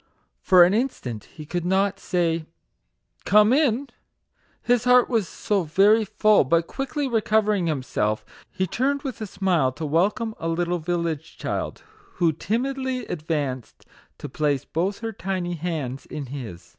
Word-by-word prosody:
For 180 -2 +7
an 180 +2 +4
instant 205 - -2
he 155 - -11
could 175 +3 -3
not 190 +2 +1
say, 165 -3 -1 0.4
" - - -41
Come 210 +3 +7
in 275 -2 +2
I" - - -28 0.7
his 245 -1 +2
heart 250 0 +5
was 225 -7 +1
so 205 +2 -1
very 200 +7 +4
full; 215 +1 +4
but 165 +5 +2
quickly 275 - -3
recovering 215 -5 +1
himself, 110 -7 -1 0.2
he 185 - -1
turned 275 +9 -1
with 255 -5 -5
a 215 - -3
smile 185 -9 +1
to 160 - -5
welcome 200 +9 +1
a 165 - -3
little 175 +1 0
village 165 -2 -3
child, - - -4 0.3
who 170 -2 +2
timidly 255 - -2
advanced 145 -7 -4 0.3
to - - -7
place 145 -1 -1
both 190 +6 -2
her 225 -1 -3
tiny 185 -2 -3
hands 150 -6 -4
in 145 - -6
his. 120 -10 -8
180 Hz, 155 wpm, -24 LUFS, 155-220 Hz, 0.7 s, For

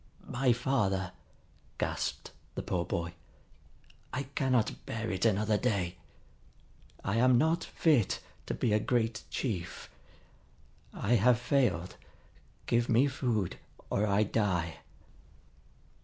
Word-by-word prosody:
"My 125 +1 +2
father," 105 -7 +1 0.7
gasped - - -2 0.2
the - - -3
poor 85 -1 -1
boy. 85 +1 -2 1.0
"I 140 - -2
cannot 130 -4 0
bear 115 0 -2
it 95 +3 -1
another 105 0 +2
day. 100 -8 0 1.1
I 100 +3 0
am 125 +1 +5
not 160 +6 +2
fit 145 - +2 0.3
to - - -2
be 110 - +1
a 105 - +4
great 115 -1 0
chief. 90 -9 -4 1.0
I 120 +4 +2
have 120 +3 +5
failed. 115 - +1 0.7
Give 120 0 +1
me 120 +4 +5
food, 120 -8 -1 0.3
or 105 +2 +2
I 100 +1 +3
die!" 95 -7 0
110 Hz, 110 wpm, -31 LUFS, 95-125 Hz, 1.1 s, am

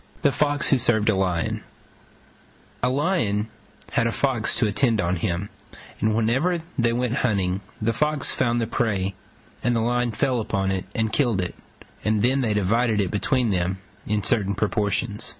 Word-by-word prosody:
THE 145 - +5
FOX 145 +1 +1
WHO 135 - +4
SERVED 110 -2 +2
A 110 - +3
LION 90 -3 -1 1.2
A 125 - +2
Lion 125 - 0 0.4
had 115 - +2
a - - 0
Fox 125 -3 0
to 120 - +2
attend 110 +1 +2
on 90 -1 +1
him, 90 +2 -2 0.5
and 110 0 +1
whenever 135 +10 +1
they 120 -3 +2
went 125 +1 0
hunting 95 -6 0 0.2
the 115 +1 0
Fox 150 +3 +1
found 120 0 +1
the 115 - 0
prey 100 -5 -1 0.5
and 120 0 +2
the - - +2
Lion 120 +1 +1
fell 125 +3 0
upon 95 -3 -1
it 95 -1 -2
and 110 -1 0
killed 120 -9 +2
it, 90 -1 -2 0.5
and 110 -1 +1
then 130 +3 +3
they 110 -4 0
divided 110 +3 +2
it 95 -3 0
between 120 +2 +1
them 90 0 0 0.3
in 105 -1 0
certain 100 -5 +1
proportions. 105 +2 -1
110 Hz, 170 wpm, -24 LUFS, 100-125 Hz, 1.2 s, THE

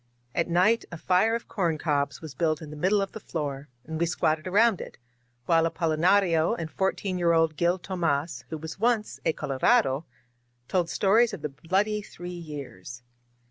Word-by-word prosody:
At 170 - 0
night 185 +7 +3
a 170 - -6
fire 190 +7 +2
of 235 - -5
corn 170 -6 0
cobs 145 -2 -1
was 155 -4 -8
built 155 +2 0
in 155 -2 -9
the - - -7
middle 190 +6 +2
of 195 - -6
the 220 - -8
floor, 145 -6 -5 0.2
and 160 0 -5
we 170 - +2
squatted 155 -1 0
around 210 +2 +3
it, - - -9 0.5
while 165 +2 +4
Apolinario 165 +1 +2
and 160 -1 -5
fourteen 190 -1 -1
year 170 -1 +3
old 165 -1 +3
Gil 175 +3 +2
Tomas, 170 -5 -2
who 160 - -4
was 160 +3 -8
once 225 -1 0
a 160 - +3
Colorado^ 140 - +2 0.6
told 175 -3 0
stories 220 +5 +3
of - - -13
the 150 - -1
Bloody 190 +9 0
Three 175 -3 -9
Years. 140 - -8
170 Hz, 180 wpm, -27 LUFS, 155-190 Hz, 0.6 s, while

